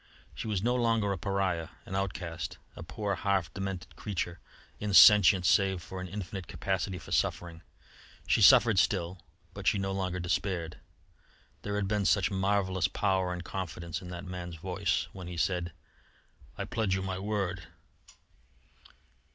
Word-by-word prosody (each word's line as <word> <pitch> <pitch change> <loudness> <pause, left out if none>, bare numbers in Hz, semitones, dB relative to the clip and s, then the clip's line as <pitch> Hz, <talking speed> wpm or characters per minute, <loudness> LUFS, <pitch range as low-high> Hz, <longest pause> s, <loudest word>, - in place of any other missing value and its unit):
She - - -6
was 105 -3 -1
no 120 +1 +2
longer 115 -4 +1
a 95 - -1
pariah, 95 -3 -1 0.2
an - - -8
outcast, 90 -4 -3 0.2
a - - -9
poor, 105 -2 -3
half 95 -2 0
demented 95 -2 -5
creature, 90 -4 -4 0.4
insentient 100 -2 +7
save 95 +3 +3
for 95 +2 -7
an 90 - -5
infinite 95 -1 -6
capacity 95 -1 -2
for - - -11
suffering. 85 -1 -1 0.6
She - - +2
suffered - - +7
still, 85 +1 0 0.3
but - - -6
she - - +4
no 95 0 -2
longer 95 -2 -2
despaired. 90 -1 -2 0.8
There 100 0 -3
had 105 -1 0
been 105 -1 0
such 100 -2 +3
marvellous 95 -2 +1
power 95 -2 0
and 90 -1 -5
confidence 85 -2 -5
in 90 - -9
that 90 +1 -7
man's 90 -2 -6
voice 90 +2 -1
when 90 -2 -8
he 90 -1 -6
said: 90 0 0 0.9
"I - - -3
pledge 110 -5 0
you 95 - -2
my 95 -1 -3
word." 95 -3 -2
95 Hz, 150 wpm, -30 LUFS, 90-100 Hz, 0.9 s, insentient